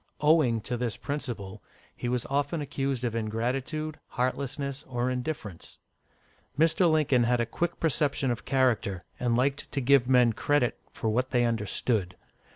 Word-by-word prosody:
Owing 150 -7 +4
to 120 +3 -3
this 120 -2 -2
principle, 120 -10 -5 0.3
he 120 - -3
was 125 -1 -1
often 145 +4 -1
accused 135 -3 -2
of 120 -2 -1
ingratitude, 125 +8 -2
heartlessness, 140 +2 -2
or 125 0 -1
indifference. 125 - -5 0.8
Mr. 165 +3 +4
Lincoln 140 -6 +3
had 120 +1 +2
a 120 - +2
quick 170 +9 -3
perception 145 -4 +1
of 120 - -4
character, 120 -9 +1 0.2
and 120 -1 +1
liked 140 +2 0
to 140 - -1
give 135 -1 +4
men 125 -3 +5
credit 145 0 +1 0.2
for 110 - -2
what 125 +4 0
they 120 -2 +2
understood. 105 -3 -1
125 Hz, 150 wpm, -28 LUFS, 115-140 Hz, 0.8 s, men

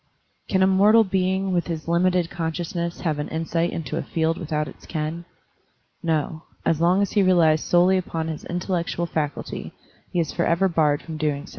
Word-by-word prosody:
Can 190 -1 +2
a - - +5
mortal 205 +4 +6
being 190 0 0
with 175 -1 0
his 165 -2 -4
limited 175 0 +2
conscious 165 0 -3
ness 170 -1 -3
have 155 -4 -1
an 150 - -2
insight 165 +1 -1
into 155 -3 -4
a - - -1
field 165 0 0
without 150 -3 -2
its - - -13
ken? 160 +2 -3 0.8
No; 160 -1 -1 0.2
as 160 -1 +1
long 180 +4 +4
as 200 - -2
he 205 - +3
relies 170 -5 +4
solely 180 +2 +4
upon 165 -3 -4
his 160 -2 -5
intellec 175 0 -2
tual 170 0 -2
faculty, 150 -3 -4 0.4
he 175 - 0
is 160 -3 0
forever 170 +2 +2
barred 155 -4 +1
from 160 -1 -6
so - - -11
doing. 150 +1 -1
170 Hz, 190 wpm, -23 LUFS, 160-185 Hz, 0.8 s, mortal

